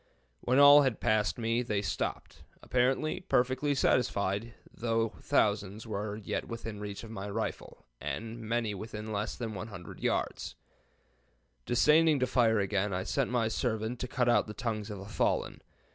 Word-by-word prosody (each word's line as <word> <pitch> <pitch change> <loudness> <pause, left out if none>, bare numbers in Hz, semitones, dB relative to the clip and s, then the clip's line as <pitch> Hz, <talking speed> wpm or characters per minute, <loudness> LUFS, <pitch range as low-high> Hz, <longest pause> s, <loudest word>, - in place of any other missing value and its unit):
When 125 +2 +1
all 145 +1 +9
had 130 -6 0
passed 105 -3 +1
me 115 0 0
they 105 -4 -1
stopped, - - -4 0.2
apparently 130 +5 +1
perfectly 130 -1 +1
satisfied, 115 -3 +1 0.2
though 115 -1 0
thousands 105 -5 +1
were 105 -1 -3
yet 105 -2 -4
within 115 -2 -6
reach 105 0 -6
of 115 - -9
my 100 -2 -5
rifle 110 - -5 0.2
and 115 +1 -4
many 115 -1 -1
within 110 +2 -6
less 105 +2 -2
than 115 -3 -4
100 95 -2 -8
yards. - - -2 1.1
Disdaining 150 +4 +4
to 130 - +2
fire 115 -3 +3
again, 100 0 0
I 95 - -2
sent 135 +5 0
my 120 -2 +1
servant 110 0 -2
to 125 - -3
cut 125 0 0
out 120 - +3
the 105 - -7
tongues 110 -2 -3
of 105 - -5
the 95 - -8
fallen. 105 - -1
115 Hz, 160 wpm, -30 LUFS, 105-125 Hz, 1.1 s, all